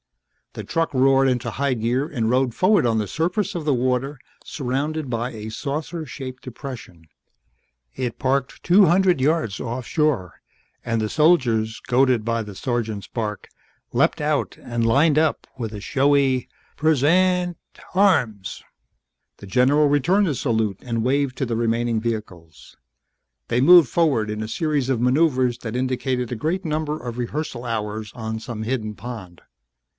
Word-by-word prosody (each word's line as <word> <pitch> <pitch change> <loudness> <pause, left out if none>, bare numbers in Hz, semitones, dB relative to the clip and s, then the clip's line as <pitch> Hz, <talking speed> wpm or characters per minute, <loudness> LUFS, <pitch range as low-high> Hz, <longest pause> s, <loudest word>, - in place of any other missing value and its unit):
The - - -6
truck 165 0 -1
roared 135 0 +4
into 125 -1 -1
high 135 +3 -1
gear 120 +4 0
and 115 -7 -1
rode 130 0 +2
forward 185 - +3
on 115 -2 +2
the 105 -2 -1
surface 195 +5 -1
of 170 - -3
the 150 - +2
water 130 +2 -1 0.2
surrounded 140 +2 -3
by 120 +1 -1
a 110 -2 -7
saucer 150 +7 -4
shaped 130 -2 -8
depression. 115 -9 -9 0.9
It 125 -3 -4
parked 135 0 -1
two 190 +3 +6
hundred 180 -3 +3
yards 145 -8 0
off 120 +1 -4
shore 145 - -1 0.4
and 115 -1 -1
the 110 - 0
soldiers, 120 -7 +2
goaded 125 -3 +3
by 115 0 0
the 105 -2 -10
sergeant's 115 -4 -3
bark, 105 -3 -4 0.5
leapt - - +2
out - - -1
and 120 -1 -2
lined 145 +6 +4
up 155 -1 0
with 115 -3 -4
a 105 - -6
showy 135 +2 +2 0.3
present 175 +4 +2 0.4
arms. 125 - +1 0.8
The 100 - -11
general 135 +7 +3
returned 175 +8 +2
the 150 - 0
salute 110 -6 -1
and 115 -2 -2
waved 135 0 0
to 135 - -1
the 115 -2 -2
remaining 115 0 0
vehicles. 90 -9 -6 0.7
They 120 +1 +1
moved 170 +1 +8
forward 130 -7 +1
in 105 0 -4
a - - -5
series 145 0 -1
of 130 -4 +1
maneuvers 130 -1 +2
that 115 -1 -6
indicated 130 -1 -1
a - - -1
great 165 - -2
number 155 -1 -2
of 120 -1 -6
rehearsal 125 0 -4
hours 110 -2 -3
on 110 -1 -4
some 110 -1 -6
hidden 110 -3 -3
pond. 105 -8 -9
125 Hz, 155 wpm, -22 LUFS, 115-150 Hz, 0.9 s, moved